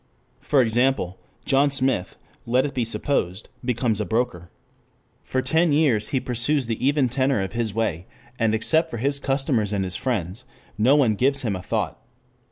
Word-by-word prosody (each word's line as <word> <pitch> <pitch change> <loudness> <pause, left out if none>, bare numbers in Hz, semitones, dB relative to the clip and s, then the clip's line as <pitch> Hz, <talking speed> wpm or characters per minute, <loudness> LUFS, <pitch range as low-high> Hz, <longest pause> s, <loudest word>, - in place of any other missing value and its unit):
For 140 -3 +3
example, 120 -5 0 0.3
John 140 0 +3
Smith, 130 -8 -1 0.3
let 125 +3 +2
it 145 - -4
be 125 - 0
supposed, 110 -5 -2
becomes 120 -3 0
a - - +1
broker. 110 -6 -2 0.7
For 130 0 -2
ten 160 0 +2
years 135 -9 +3
he 135 - 0
pursues 125 +3 0
the 115 +1 -4
even 140 0 +3
tenor 130 0 +1
of 95 +1 -3
his 115 -2 -1
way 95 -5 -2 0.3
and 110 -1 +2
except 160 +9 +2
for 135 - -5
his 140 +4 0
customers 135 -7 0
and 100 -2 0
his 90 - -5
friends 105 -4 -3 0.3
no 120 +6 +4
one 130 -7 +3
gives 135 +5 +1
him 105 -5 -1
a 90 - -5
thought. - - -2
125 Hz, 175 wpm, -23 LUFS, 110-135 Hz, 0.7 s, no